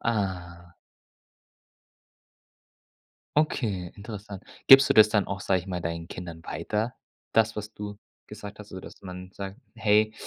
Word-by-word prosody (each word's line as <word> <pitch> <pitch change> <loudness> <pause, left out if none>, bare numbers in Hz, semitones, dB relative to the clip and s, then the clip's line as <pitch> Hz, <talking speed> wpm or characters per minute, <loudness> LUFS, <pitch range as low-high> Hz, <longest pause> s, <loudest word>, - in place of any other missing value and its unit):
Aha. 90 -6 -2 2.6
Okay, 105 - +1
interessant. 105 -1 -8 0.2
Gibst 135 +1 +10
du - - +3
das 110 0 +9
dann 105 -2 +2
auch, 100 -1 -4
sag 95 0 +2
ich 90 - -8
mal, 90 -2 -3
deinen 85 0 -3
Kindern 85 -2 -8
weiter? 110 +4 -2 0.4
Das, 110 -1 +3
was 105 +1 -6
du 105 0 -6 0.3
gesagt 105 0 -9
hast, 105 - -11
so 95 - -7
dass - - -12
man 90 0 -8
sagt: 100 +2 -7 0.2
„Hey” 110 0 +3
100 Hz, 140 wpm, -27 LUFS, 90-110 Hz, 2.6 s, Gibst